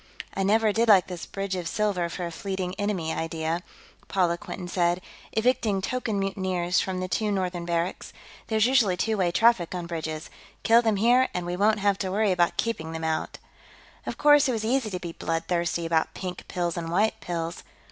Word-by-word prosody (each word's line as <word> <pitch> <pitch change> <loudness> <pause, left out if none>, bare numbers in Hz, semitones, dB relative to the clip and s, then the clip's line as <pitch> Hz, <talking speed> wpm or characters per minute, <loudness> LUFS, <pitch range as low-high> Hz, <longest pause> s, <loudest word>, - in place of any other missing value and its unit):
"I 195 - -2
never 215 +2 +3
did 230 +2 +2
like 195 -4 +7
this 180 -2 -7
bridge 195 -1 -3
of 180 -2 -3
silver 200 -5 0
for 175 +1 -4
a 170 - -5
fleeing 190 -1 -4
enemy 190 -6 -1
idea," 165 +1 -2 0.5
Paula 180 -3 +2
Quinton 180 -1 -7
said, 175 0 +1 0.3
evicting 225 -3 +1
token 220 +1 -2
mutineers 185 -2 0
from 190 -1 -2
the 185 - -2
two 210 +4 0
northern 180 -3 -2
barracks. 170 +1 -2 0.4
"There's 220 -1 +2
usually 235 -8 +3
two 220 +4 0
way 185 -4 +1
traffic 200 -4 +3
on 175 -1 -4
bridges. 160 -2 -5 0.3
Kill 230 +1 +6
them 220 -3 +1
here 245 +5 +4
and 180 -1 -2
we 175 0 -2
won't 210 +2 +2
have 200 -1 +2
to 190 - -2
worry 205 +1 +2
about 175 -2 +2
keeping 165 -9 -2
them 160 0 -5
out." 160 0 -2 0.7
Of - - -4
course, 295 -1 +6
it - - +1
was 220 -1 -2
easy 245 -1 +1
to 185 -3 -4
be 170 -1 -6
bloodthirsty 170 +1 -1
about 165 -1 0
pink 180 -1 -6
pills 175 -2 -2
and 165 -1 -3
white 205 +6 +1
pills. 170 -1 -4
185 Hz, 195 wpm, -26 LUFS, 170-215 Hz, 0.7 s, like